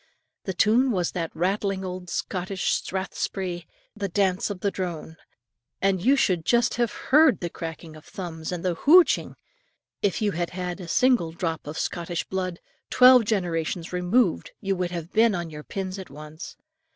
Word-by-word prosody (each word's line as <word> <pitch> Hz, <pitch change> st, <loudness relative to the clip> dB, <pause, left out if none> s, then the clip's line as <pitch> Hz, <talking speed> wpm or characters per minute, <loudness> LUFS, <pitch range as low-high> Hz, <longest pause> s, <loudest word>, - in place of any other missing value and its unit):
The 190 Hz, -, -2 dB
tune 235 Hz, +5 st, +4 dB
was 180 Hz, -7 st, 0 dB
that 165 Hz, -2 st, -3 dB
rattling 190 Hz, +2 st, -1 dB
old 180 Hz, -1 st, -6 dB
Scotch 185 Hz, +1 st, -2 dB
strathspey, 185 Hz, -2 st, -3 dB, 0.3 s
"The 200 Hz, -3 st, -4 dB
Miller 190 Hz, -2 st, +2 dB
of 200 Hz, 0 st, -2 dB
Drone"; 170 Hz, -4 st, -5 dB, 0.6 s
and 190 Hz, -2 st, +1 dB
you 265 Hz, +5 st, +5 dB
should 180 Hz, -11 st, +1 dB
just 235 Hz, +8 st, +2 dB
have 240 Hz, -3 st, +1 dB
heard 290 Hz, -, +4 dB
the 175 Hz, -, -4 dB
cracking 165 Hz, -1 st, -7 dB
of 155 Hz, -, -13 dB
thumbs 160 Hz, -4 st, -6 dB
and 180 Hz, 0 st, -4 dB
the 180 Hz, -, +2 dB
hooch! 330 Hz, -, +6 dB
ing, -, -, -10 dB, 0.7 s
if 200 Hz, -3 st, +1 dB
you 210 Hz, -2 st, +1 dB
had 175 Hz, -1 st, -2 dB
had 180 Hz, 0 st, -3 dB
a 175 Hz, -, -8 dB
single 245 Hz, -5 st, +3 dB
drop 165 Hz, -3 st, -3 dB
of 150 Hz, +3 st, -6 dB
Scottish 170 Hz, -1 st, -2 dB
blood, 185 Hz, -2 st, -4 dB, 0.3 s
twelve 250 Hz, -2 st, +7 dB
generations 175 Hz, -4 st, -2 dB
removed, 180 Hz, +8 st, +1 dB
you 195 Hz, -2 st, -1 dB
would 180 Hz, -1 st, -2 dB
have 170 Hz, 0 st, -6 dB
been 225 Hz, -1 st, +4 dB
on 170 Hz, -2 st, -4 dB
your 150 Hz, 0 st, -8 dB
pins 190 Hz, +2 st, -5 dB
at 190 Hz, -, -9 dB
once. 155 Hz, +3 st, -10 dB
185 Hz, 170 wpm, -25 LUFS, 170-205 Hz, 0.7 s, twelve